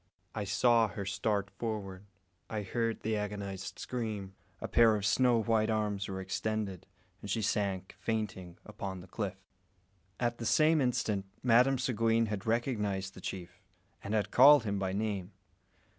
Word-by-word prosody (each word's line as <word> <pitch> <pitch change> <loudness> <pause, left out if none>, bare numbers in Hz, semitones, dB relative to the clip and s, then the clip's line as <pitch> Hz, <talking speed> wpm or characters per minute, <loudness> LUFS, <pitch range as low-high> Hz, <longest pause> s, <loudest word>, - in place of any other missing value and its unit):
I 105 - -3
saw 115 +3 +4
her 100 -1 -6
start 100 0 -1
forward; 105 -4 -5 0.4
I 105 -2 -3
heard 115 +3 -2
the 110 0 -1
agonised 100 -2 -4
scream; 110 -6 -4 0.3
a - - -4
pair 115 -2 +5
of 100 -1 -2
snow 120 +1 +3
white 110 0 +2
arms 105 -2 -1
were 95 -1 -4
extended, 95 0 -3 0.3
and 100 - -8
she 110 +2 0
sank, 95 -2 -1
fainting, 95 -6 -3
upon 95 -3 -6
the 90 - -13
cliff. 100 +1 -4 0.8
At 120 -1 -1
the 115 - -4
same 155 +3 +4
instant 115 -6 0 0.2
Madame 125 +2 +5
Seguin 115 -2 +2
had 105 -1 -4
recognised 105 -5 -1
the 95 - -12
chief, 90 -2 -7 0.4
and 105 +2 -2
had 105 -2 0
called 140 +1 +8
him 100 -2 -2
by 95 -1 -1
name. 100 -2 -3
105 Hz, 155 wpm, -32 LUFS, 95-115 Hz, 0.8 s, called